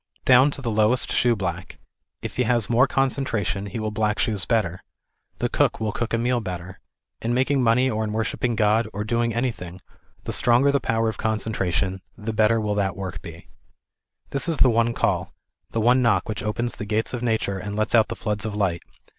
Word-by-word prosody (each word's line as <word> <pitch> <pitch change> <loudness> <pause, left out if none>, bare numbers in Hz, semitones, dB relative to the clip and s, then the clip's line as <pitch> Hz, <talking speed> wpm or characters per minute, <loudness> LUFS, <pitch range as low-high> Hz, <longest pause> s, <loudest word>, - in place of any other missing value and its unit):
Down 130 +2 +6
to 140 -1 -6
the 115 - -1
lowest 110 +3 +2
shoeblack, 95 -7 0 0.5
if - - -6
he - - +2
has 120 -2 +2
more 125 +4 +4
concentration 115 -7 0
he 100 - -6
will 110 0 -2
black 105 0 0
shoes 105 -4 0
better, 100 -7 0 0.6
the - - 0
cook - - +1
will 110 -1 -1
cook 120 +2 -3
a 115 - +1
meal 120 +1 +1
better. 90 -1 -7 0.4
In 120 +1 -1
making 135 +2 +2
money 125 +2 +3
or 110 -3 -1
in 105 - -3
worship 110 +1 -2
ping 120 -2 0
God, 110 +1 +2
or 105 +1 -3
doing 115 +2 0
anyting, 110 -7 -3 0.4
the - - -4
stronger 125 +4 +3
the 140 - +2
power 115 -3 0
of 110 - -3
concentration, 95 -4 -1 0.2
the 110 +1 -4
better 110 +1 +3
will 105 -1 -1
that 100 -2 -1
work 95 -4 -5
be. 85 0 -11 0.8
This 140 +4 +1
is 165 - +1
the 130 - +5
one 115 +1 +2
call, - - -1 0.3
the 115 - -2
one 125 +3 +4
knock 100 -7 +2
which 105 -2 -4
opens 120 +3 -3
the 105 - -5
gates 110 +3 -1
of 120 - -3
Nature 110 -5 -1
and 100 +2 -5
lets 110 +1 -1
out 110 -2 +5
the - - -5
floods 105 -2 -3
of 110 -2 -4
light. 95 -5 0
110 Hz, 205 wpm, -23 LUFS, 105-120 Hz, 0.8 s, Down